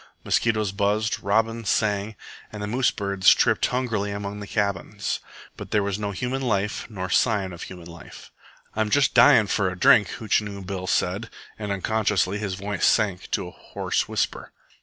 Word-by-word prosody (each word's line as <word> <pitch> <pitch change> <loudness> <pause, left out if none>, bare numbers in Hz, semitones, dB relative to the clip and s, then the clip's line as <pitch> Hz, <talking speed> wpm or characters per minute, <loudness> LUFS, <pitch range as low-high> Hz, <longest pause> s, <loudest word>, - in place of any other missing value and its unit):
Mosquitoes 110 -4 +1
buzzed, 105 +2 0
robins 115 +1 0
sang, 105 0 0 0.4
and 105 -1 -5
moose 125 +1 +2
birds 100 -2 +3
tripped - - +2
hungrily 115 -5 -1
among 100 0 -5
the 100 - -7
cabins; 100 -6 -2 0.4
but - - -9
there 105 -1 +1
was 100 0 -2
no 105 -1 -2
human 125 +7 -3
life 105 -4 -1
nor 95 -4 -5
sign 100 -2 +1
of 85 - -10
human 90 -2 -9
life. 85 0 -12 0.4
"I'm 110 -1 0
just 140 +3 +3
dyin' 115 -2 +7
for 100 -1 0
a 90 - -7
drink," 100 +2 +6
Hootchinoo 105 -3 -1
Bill 95 -1 -5
said 100 +6 0 0.3
and 105 -2 -4
unconsciously 100 -1 0
his 100 -3 -3
voice 100 +1 -4
sank 100 -5 +1
to - - -2
a - - -9
hoarse - - -3
whisper. - - -2
105 Hz, 165 wpm, -24 LUFS, 95-110 Hz, 0.4 s, dyin